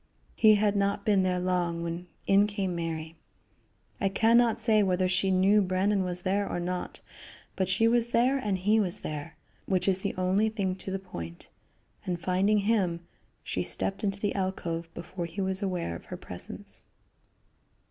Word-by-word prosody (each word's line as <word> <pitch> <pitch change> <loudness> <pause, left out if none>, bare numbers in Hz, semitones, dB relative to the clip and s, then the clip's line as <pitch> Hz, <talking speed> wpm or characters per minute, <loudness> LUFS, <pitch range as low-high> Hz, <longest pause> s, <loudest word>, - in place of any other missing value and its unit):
He 215 -1 +6
had 205 0 +2
not 200 0 0
been 205 -3 +4
there 185 -1 +1
long 175 -2 0
when 170 +1 -5 0.2
in 200 +1 +5
came 200 -3 -2
Mary. 165 -1 -4 0.8
I 195 - +1
can 225 +4 +3
not 235 -2 +4
say 220 -2 +3
whether 185 -2 +2
she 190 +1 +1
knew 190 +3 +4
Brandon 190 +2 +1
was 180 -1 -3
there 200 +3 0
or - - -2
not, 180 +1 -4 0.5
but 190 -1 -1
she 225 +4 +3
was 235 0 +3
there 250 +3 +2
and 205 -6 -1
he 210 +4 +3
was 185 -5 -1
there, 150 +1 -6 0.3
which 185 -1 +1
is 190 -1 +3
the - - -3
only 190 +4 +2
thing 200 -4 -1
to 190 - -6
the 190 - -1
point, 85 - -8 0.5
and 180 -2 -3
finding 185 +4 +2
him, 190 -7 +1 0.4
she - - -2
stepped 195 +2 -1
into 200 -1 -1
the 205 0 -1
alcove 170 -4 -3
before 175 0 -5
he 185 - -8
was 190 0 0
aware 180 - -2
of - - -10
her - - -7
presence. - - -8
190 Hz, 180 wpm, -28 LUFS, 180-205 Hz, 0.8 s, He